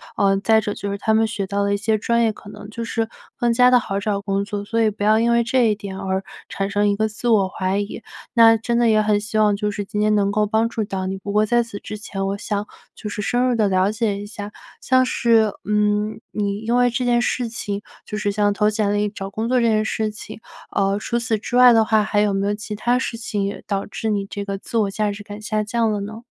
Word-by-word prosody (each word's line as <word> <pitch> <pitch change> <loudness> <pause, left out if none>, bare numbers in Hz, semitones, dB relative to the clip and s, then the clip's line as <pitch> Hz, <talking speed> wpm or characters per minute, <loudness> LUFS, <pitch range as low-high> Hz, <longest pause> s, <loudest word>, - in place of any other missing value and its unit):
呃， 195 -1 +3
再 220 +2 +3
者 205 -1 -3
就 200 0 -4
是 200 - -3
他 220 +1 +1
们 225 0 +4
学 205 -3 -3
到 200 +1 -1
的 200 0 +1
一 - - +1
些 215 +1 +1
专 235 +3 +1
业， 220 - +3
可 205 -1 -12
能 205 0 -10
就 230 +1 -5
是 225 0 -2 0.3
更 240 -1 +1
加 250 +1 +5
地 250 - +6
好 195 -3 -3
找 200 -1 -1
工 200 0 -1
作， 205 0 -4
所 230 +2 -2
以 220 -1 +3
不 205 - -6
要 215 +1 +4
因 235 +1 +2
为 235 0 +3
这 235 -2 +2
一 - - +2
点 200 -2 -7
而 190 0 -2 0.2
产 195 0 -3
生 205 0 +1
一 200 - +2
个 220 +1 +1
自 215 +3 -5
我 200 -5 +3
怀 190 +2 -1
疑。 205 +2 -5 0.3
那 225 -1 +7
真 235 +2 -1
的 240 -1 +3
也 215 -1 +4
很 210 -1 +2
希 210 +1 -2
望 210 -1 +4
就 210 0 -2
是 205 0 -4
今 210 +1 -5
天 210 0 +3
能 200 -1 +2
够 210 0 +2
帮 220 +2 +1
助 220 - -2
到 190 -2 -3
你。 190 0 -3
不 200 +1 -6
过 210 +1 +2
在 240 +1 +3
此 205 -3 -8
之 210 - -7
前， 195 -2 -4
我 200 +1 -2
想 205 +1 -3 0.3
就 210 - -7
是 210 0 -4
深 245 +3 +1
入 245 - +1
地 215 -3 +2
了 190 +1 +2
解 210 -2 -1
一 205 - -7
下， 205 -1 -7 0.3
像 255 0 +3
是， 230 -4 +3 0.2
嗯， 210 0 0
你 200 -1 -2
因 230 +2 -1
为 245 -1 +3
这 250 +1 -1
件 240 -1 +3
事 245 -3 -1
情 205 -3 -4 0.2
就 210 - -6
是 205 -1 0
像 205 0 +1
投 210 +1 +2
简 210 -1 0
历、 205 0 +1
找 195 -1 -7
工 220 +3 -3
作 255 - +3
这 - - +2
件 215 -1 +2
事 215 0 -1
情， 210 +1 -10 0.4
呃， 195 +1 +1
除 235 - -2
此 230 -3 -1
之 240 - -5
外 250 -1 +8
的 225 -1 +5
话， 215 -1 +3
还 210 -1 0
有 205 -1 +2
没 195 0 0
有 205 - +1
其 210 0 -6
它 245 +4 +1
事 235 -3 -3
情 210 -3 -3
也 200 0 -4
导 200 -1 -2
致 220 +1 -4
你 200 -2 0
这 200 0 -5
个 195 -1 -3
自 230 - -5
我 205 -3 +1
价 210 0 -1
值 205 +1 -8
感 205 +1 -9
下 215 0 -1
降 225 0 0
了 205 -1 -2
呢？ 220 +3 -7
210 Hz, 295 characters per minute, -21 LUFS, 200-225 Hz, 0.4 s, 外